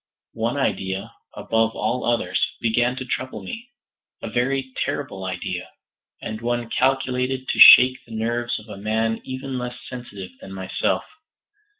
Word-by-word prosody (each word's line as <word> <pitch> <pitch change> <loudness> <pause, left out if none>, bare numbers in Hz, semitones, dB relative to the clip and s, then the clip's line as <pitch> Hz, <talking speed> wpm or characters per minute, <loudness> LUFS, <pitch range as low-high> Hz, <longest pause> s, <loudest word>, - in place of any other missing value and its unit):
One - - -1
idea, 95 0 -2 0.2
above 115 0 0
all 120 +4 -1
others, 120 +1 +1 0.2
began 120 +2 +1
to 130 - -5
trouble 125 -4 -4
me: 230 - -7 0.5
a - - -4
very 130 +2 0
terrible 135 -9 -4
idea, 95 -1 -4 0.5
and 110 0 -5
one 120 0 -2
calculated 130 0 0
to - - -1
shake 130 0 +10
the 115 - -8
nerves 120 +2 -1
of 110 - -11
a 105 -2 -8
man 110 +1 0
even 130 0 -5
less 125 0 -5
sensitive 120 -7 -8
than 95 - -9
myself. 95 0 -1
120 Hz, 140 wpm, -23 LUFS, 110-130 Hz, 0.5 s, shake